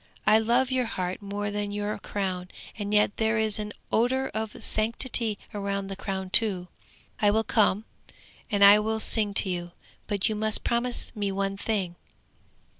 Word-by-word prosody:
I 215 Hz, +1 st, +5 dB
love 240 Hz, +4 st, +1 dB
your 255 Hz, -1 st, +1 dB
heart 185 Hz, -2 st, -4 dB
more 205 Hz, +1 st, -4 dB
than 205 Hz, 0 st, -3 dB
your 205 Hz, +1 st, -3 dB
crown, 185 Hz, -3 st, -4 dB, 0.3 s
and 205 Hz, -2 st, -5 dB
yet 210 Hz, 0 st, +2 dB
there 220 Hz, 0 st, +1 dB
is 220 Hz, -1 st, 0 dB
an 210 Hz, 0 st, -5 dB, 0.2 s
odour 260 Hz, +4 st, +1 dB
of 220 Hz, 0 st, -5 dB
sanctity 225 Hz, 0 st, 0 dB, 0.2 s
round 200 Hz, -1 st, -3 dB
the -, -, -4 dB
crown 190 Hz, -1 st, -5 dB
too! 190 Hz, -6 st, +4 dB, 0.5 s
I 205 Hz, -, +4 dB
will 220 Hz, +2 st, +2 dB
come, 215 Hz, -1 st, +2 dB, 0.6 s
and 200 Hz, -3 st, +4 dB
I 205 Hz, +1 st, +8 dB
will 220 Hz, +1 st, -1 dB
sing 210 Hz, -2 st, 0 dB
to -, -, +4 dB
you! 175 Hz, -1 st, -5 dB, 0.3 s
But 205 Hz, -3 st, +1 dB
you 220 Hz, -, 0 dB
must 215 Hz, 0 st, +6 dB
promise 240 Hz, +1 st, -2 dB
me 205 Hz, -2 st, -2 dB
one 195 Hz, 0 st, -2 dB
thing! 195 Hz, -4 st, -3 dB
210 Hz, 170 wpm, -26 LUFS, 200-220 Hz, 0.6 s, I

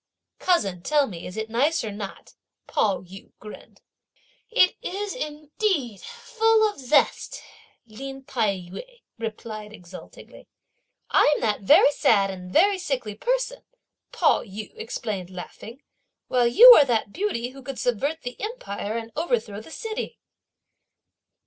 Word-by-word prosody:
"Cousin, 200 Hz, -, +1 dB
tell 295 Hz, +8 st, +2 dB
me 175 Hz, -8 st, -8 dB
is 180 Hz, -, -9 dB
it 220 Hz, 0 st, -3 dB
nice 265 Hz, +8 st, +1 dB
or 220 Hz, -, -4 dB
not?" 200 Hz, -1 st, -8 dB, 0.3 s
Pao 200 Hz, -3 st, 0 dB
yü 190 Hz, +2 st, -13 dB
grinned. 210 Hz, 0 st, -12 dB, 0.7 s
"It 405 Hz, -6 st, +4 dB
is 405 Hz, +2 st, -4 dB
indeed 300 Hz, -, -2 dB
full 450 Hz, -2 st, +1 dB
of 415 Hz, -, -6 dB
zest!" 275 Hz, +2 st, +1 dB, 0.5 s
Lin 270 Hz, +4 st, -9 dB
Tai 225 Hz, -7 st, 0 dB, 0.2 s
yü -, -, -10 dB, 0.2 s
replied 215 Hz, -1 st, -6 dB
exultingly. 180 Hz, -3 st, -13 dB, 0.6 s
"I'm 295 Hz, -, +4 dB
that 210 Hz, -2 st, 0 dB
very 295 Hz, -, +6 dB
sad 205 Hz, -9 st, +3 dB
and 180 Hz, -1 st, -9 dB
very 390 Hz, -, +4 dB
sickly 255 Hz, -, -3 dB
person," -, -, -2 dB, 0.5 s
Pao -, -, +3 dB
yü 205 Hz, +2 st, -9 dB
explained 200 Hz, -5 st, -5 dB
laughing, 215 Hz, +7 st, -10 dB, 0.5 s
"while 245 Hz, -2 st, +3 dB
you 465 Hz, -, +10 dB
are 290 Hz, -, +6 dB
that 225 Hz, -5 st, -1 dB
beauty 345 Hz, -, -2 dB
who 270 Hz, +1 st, -12 dB
could 265 Hz, 0 st, -7 dB
subvert 280 Hz, +7 st, -1 dB
the 245 Hz, 0 st, -7 dB
empire 225 Hz, -, -4 dB
and 230 Hz, 0 st, -6 dB
overthrow 230 Hz, -9 st, -1 dB
the 220 Hz, -, -14 dB
city." 440 Hz, +6 st, -5 dB
245 Hz, 135 wpm, -24 LUFS, 210-345 Hz, 0.7 s, you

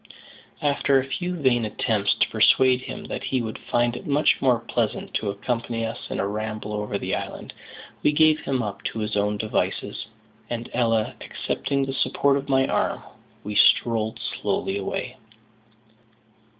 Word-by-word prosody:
After 140 Hz, -1 st, +3 dB
a 130 Hz, -, -2 dB
few 175 Hz, +6 st, -3 dB
vain 125 Hz, -4 st, +3 dB
attempts 105 Hz, -1 st, 0 dB
to -, -, +2 dB
persuade 130 Hz, -1 st, +4 dB
him -, -, -7 dB
that -, -, -5 dB
he 130 Hz, -, 0 dB
would 110 Hz, -2 st, -4 dB
find 120 Hz, 0 st, +1 dB
it -, -, -8 dB
much 145 Hz, +1 st, +3 dB
more 125 Hz, -3 st, +4 dB
pleasant 115 Hz, -1 st, -2 dB
to 105 Hz, -, -1 dB
accompany 115 Hz, +2 st, -2 dB
us 115 Hz, -, -6 dB
in -, -, -3 dB
a 100 Hz, -, +1 dB
ramble 105 Hz, 0 st, -4 dB
over 105 Hz, -1 st, -2 dB
the -, -, -3 dB
island, -, -, -5 dB, 0.5 s
we -, -, +4 dB
gave 155 Hz, 0 st, +5 dB
him 130 Hz, -3 st, -1 dB
up 105 Hz, -2 st, -5 dB
to -, -, -3 dB
his 105 Hz, -1 st, -2 dB
own 105 Hz, 0 st, +1 dB
devices; 105 Hz, -1 st, -2 dB, 0.4 s
and, 120 Hz, 0 st, -4 dB
Ella 115 Hz, -3 st, +1 dB
accepting 140 Hz, -1 st, -2 dB
the 135 Hz, -, -4 dB
support 140 Hz, +1 st, +2 dB
of 140 Hz, 0 st, -3 dB
my 135 Hz, -1 st, +4 dB
arm, -, -, 0 dB, 0.4 s
we 105 Hz, -, -4 dB
strolled 110 Hz, 0 st, +3 dB, 0.2 s
slowly 95 Hz, -, -1 dB
away. 125 Hz, +6 st, -4 dB
120 Hz, 165 wpm, -24 LUFS, 105-135 Hz, 0.5 s, gave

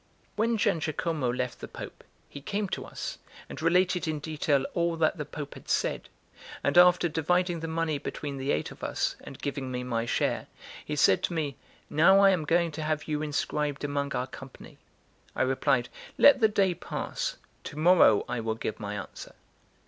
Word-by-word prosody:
When 230 Hz, +2 st, +1 dB
Giangiacomo 165 Hz, -, 0 dB
left 125 Hz, 0 st, -3 dB
the -, -, -7 dB
Pope, -, -, -9 dB, 0.2 s
he 145 Hz, -, -10 dB
came 200 Hz, +7 st, -2 dB
to -, -, -4 dB
us, -, -, -6 dB, 0.3 s
and -, -, -8 dB
related 180 Hz, +1 st, +2 dB
in 155 Hz, -1 st, -1 dB
detail 145 Hz, -2 st, 0 dB
all 170 Hz, -1 st, +1 dB
that 160 Hz, +1 st, +2 dB
the 150 Hz, -, -4 dB
Pope 145 Hz, -1 st, -7 dB
had -, -, -13 dB
said; -, -, 0 dB, 0.5 s
and -, -, +1 dB
after 175 Hz, 0 st, +6 dB
dividing 175 Hz, +2 st, 0 dB
the 165 Hz, -, -4 dB
money 160 Hz, -2 st, -1 dB
between 140 Hz, -1 st, -5 dB
the 135 Hz, +1 st, -1 dB
eight 75 Hz, -, -1 dB
of -, -, -13 dB
us, -, -, -1 dB
and 135 Hz, -, -9 dB
giving 140 Hz, -2 st, -4 dB
me 125 Hz, 0 st, -3 dB
my 115 Hz, -2 st, -2 dB
share, -, -, 0 dB, 0.4 s
he 150 Hz, -, -4 dB
said 95 Hz, -9 st, +4 dB
to -, -, -5 dB
me: 150 Hz, -5 st, -2 dB, 0.3 s
"Now 170 Hz, +6 st, +5 dB
I 200 Hz, -1 st, +7 dB
am 170 Hz, -5 st, 0 dB
going 170 Hz, +2 st, +2 dB
to 155 Hz, -, -6 dB
have 155 Hz, -1 st, -2 dB
you 150 Hz, -1 st, -1 dB
inscribed 150 Hz, -1 st, -2 dB
among 140 Hz, -1 st, -2 dB
our 125 Hz, -, -1 dB
company." 130 Hz, 0 st, -12 dB, 0.6 s
I -, -, +2 dB
replied: 130 Hz, -1 st, +1 dB, 0.3 s
"Let 285 Hz, -, +7 dB
the 220 Hz, -, +5 dB
day 200 Hz, -3 st, +2 dB
pass; -, -, -4 dB, 0.3 s
to 145 Hz, -, -7 dB
morrow 160 Hz, -, +5 dB
I 125 Hz, -, -2 dB
will 110 Hz, -1 st, -2 dB
give 110 Hz, -, -4 dB
my 105 Hz, -1 st, -4 dB
answer." 105 Hz, -, -8 dB
155 Hz, 185 wpm, -28 LUFS, 135-175 Hz, 0.6 s, I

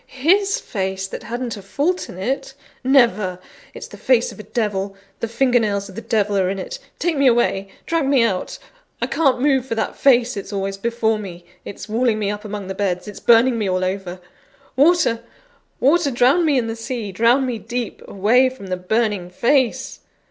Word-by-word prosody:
his 380 Hz, +10 st, +2 dB
face, 190 Hz, -2 st, -3 dB
that -, -, -7 dB
hadn't 240 Hz, +1 st, -4 dB
a 205 Hz, -, -9 dB
fault 290 Hz, -, -1 dB
in -, -, -9 dB
it? 270 Hz, +7 st, -3 dB, 0.3 s
Never! 230 Hz, -9 st, +3 dB, 0.4 s
It's -, -, -7 dB
the -, -, -12 dB
face 245 Hz, -2 st, +2 dB
of 205 Hz, -, -13 dB
a 210 Hz, -, -11 dB
devil; 200 Hz, -4 st, -2 dB, 0.2 s
the 230 Hz, -, -2 dB
finger 245 Hz, +2 st, +2 dB
nails 200 Hz, -2 st, -1 dB
of -, -, -11 dB
the 225 Hz, -, -6 dB
devil 210 Hz, -3 st, 0 dB
are 185 Hz, -1 st, +1 dB
on 195 Hz, -, -2 dB
it! -, -, -6 dB, 0.2 s
Take 340 Hz, -3 st, 0 dB
me 275 Hz, -, +5 dB
away! 230 Hz, -5 st, +2 dB, 0.2 s
drag 330 Hz, -4 st, 0 dB
me 270 Hz, -4 st, +4 dB
out! 195 Hz, -5 st, -1 dB, 0.4 s
I -, -, 0 dB
can't 270 Hz, -6 st, +1 dB
move 270 Hz, -1 st, +2 dB
for 230 Hz, -, -2 dB
that 225 Hz, -, -2 dB
face: 250 Hz, -2 st, +3 dB
it's 200 Hz, 0 st, -6 dB
always 195 Hz, -1 st, -2 dB
before 225 Hz, 0 st, 0 dB
me: 180 Hz, -4 st, -9 dB, 0.2 s
it's 200 Hz, -, -8 dB
walling 225 Hz, 0 st, +1 dB
me 205 Hz, -1 st, -1 dB
up 205 Hz, 0 st, -6 dB
among 210 Hz, -2 st, -5 dB
the 190 Hz, -, -4 dB
beds: 190 Hz, -1 st, -2 dB
it's 205 Hz, -, -8 dB
burning 235 Hz, +1 st, +4 dB
me 205 Hz, -3 st, 0 dB
all 185 Hz, 0 st, 0 dB
over. 185 Hz, -1 st, -4 dB, 0.6 s
Water! 285 Hz, -5 st, +3 dB, 0.6 s
water! 295 Hz, +3 st, +3 dB
drown 265 Hz, +7 st, +3 dB
me 295 Hz, -3 st, +3 dB
in 245 Hz, -, +1 dB
the 225 Hz, 0 st, -4 dB
sea; 225 Hz, -2 st, -5 dB
drown 235 Hz, +7 st, +3 dB
me 245 Hz, -3 st, -3 dB
deep, 240 Hz, 0 st, -5 dB
away 235 Hz, +7 st, +3 dB
from 250 Hz, -7 st, -11 dB
the 185 Hz, -, -1 dB
burning 205 Hz, -1 st, -1 dB
face!" 245 Hz, +6 st, +1 dB
230 Hz, 200 wpm, -20 LUFS, 200-260 Hz, 0.6 s, me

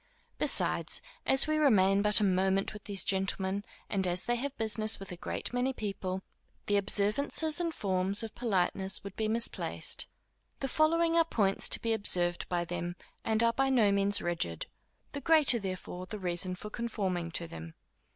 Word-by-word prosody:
Besides, -, -, +2 dB, 0.3 s
as 265 Hz, 0 st, +6 dB
we 310 Hz, 0 st, 0 dB
remain 200 Hz, -9 st, +4 dB
but 210 Hz, +1 st, +5 dB
a -, -, +1 dB
moment 190 Hz, +1 st, +1 dB
with 210 Hz, -, -11 dB
these 200 Hz, -2 st, +1 dB
gentlemen, 195 Hz, 0 st, 0 dB, 0.2 s
and 190 Hz, -2 st, -1 dB
as 180 Hz, 0 st, 0 dB
they 240 Hz, -, +1 dB
have 280 Hz, +3 st, -5 dB
business 220 Hz, 0 st, 0 dB
with 195 Hz, -1 st, -9 dB
a -, -, -5 dB
great 175 Hz, -, -4 dB
many 250 Hz, +2 st, 0 dB
people, 190 Hz, -4 st, -4 dB, 0.4 s
the 205 Hz, -, +1 dB
observances 215 Hz, -, +1 dB
and 335 Hz, -1 st, -1 dB
forms 195 Hz, -3 st, 0 dB
of 220 Hz, -, -6 dB
politeness 190 Hz, -4 st, 0 dB
would 200 Hz, -1 st, -8 dB
be 220 Hz, -, -1 dB
misplaced. 230 Hz, +2 st, -1 dB, 0.5 s
The 270 Hz, -, -2 dB
following 330 Hz, +4 st, +2 dB
are 335 Hz, -, +5 dB
points 205 Hz, -11 st, 0 dB
to -, -, +7 dB
be 230 Hz, -1 st, 0 dB
observed 175 Hz, -5 st, +1 dB
by 175 Hz, -1 st, -1 dB
them, 175 Hz, 0 st, -4 dB, 0.3 s
and 220 Hz, 0 st, +1 dB
are 230 Hz, 0 st, +3 dB
by 270 Hz, +2 st, +1 dB
no 230 Hz, -6 st, +3 dB
means 200 Hz, 0 st, +2 dB
rigid; 160 Hz, -, -2 dB, 0.5 s
the 285 Hz, -, -6 dB
greater 305 Hz, -7 st, +4 dB
therefore 185 Hz, -2 st, -6 dB
the 215 Hz, -, -6 dB
reason 180 Hz, -1 st, -2 dB
for 210 Hz, +3 st, -9 dB
conforming 195 Hz, -8 st, -3 dB
to 170 Hz, -, -2 dB
them. 80 Hz, -, -10 dB
200 Hz, 175 wpm, -30 LUFS, 185-235 Hz, 0.5 s, to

